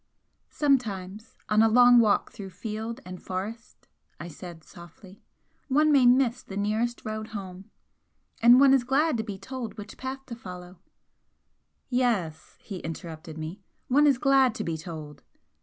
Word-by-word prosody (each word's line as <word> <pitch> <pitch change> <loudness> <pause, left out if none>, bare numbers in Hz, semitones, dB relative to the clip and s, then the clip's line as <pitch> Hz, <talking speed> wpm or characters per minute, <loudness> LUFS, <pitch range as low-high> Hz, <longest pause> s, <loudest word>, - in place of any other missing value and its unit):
"Sometimes 215 -8 -1
on 215 0 +3
a 225 - +5
long 245 +1 +7
walk 215 -3 +2
through 195 -2 -9
field 220 +6 -6
and 185 0 -9
forest," 210 +6 -7 0.3
I 170 - -7
said, 170 0 -10
softly 175 +4 -15 0.5
"one 300 +3 +3
may 270 -4 +5
miss 245 -1 +3
the 195 - -9
nearest 220 +4 -1
road 215 0 -4
home. 195 -3 -8 0.7
And 240 +2 +8
one 275 -1 +6
is 265 -2 +3
glad 275 +4 +1
to 220 - -2
be 205 -3 -6
told 235 +3 -7
which 210 0 -9
path 265 +1 -6
to 240 - -7
follow 180 -4 -10 0.6
" - - -48 0.3
"Yes," 230 -11 -1
he 195 -4 -7
interrupted 160 -1 -8
me 160 +6 -7 0.3
"One 290 +4 +5
is 275 -3 +4
glad 270 -2 +3
to - - -3
be 165 - -3
told!" 155 -2 -9
215 Hz, 155 wpm, -27 LUFS, 185-250 Hz, 0.7 s, And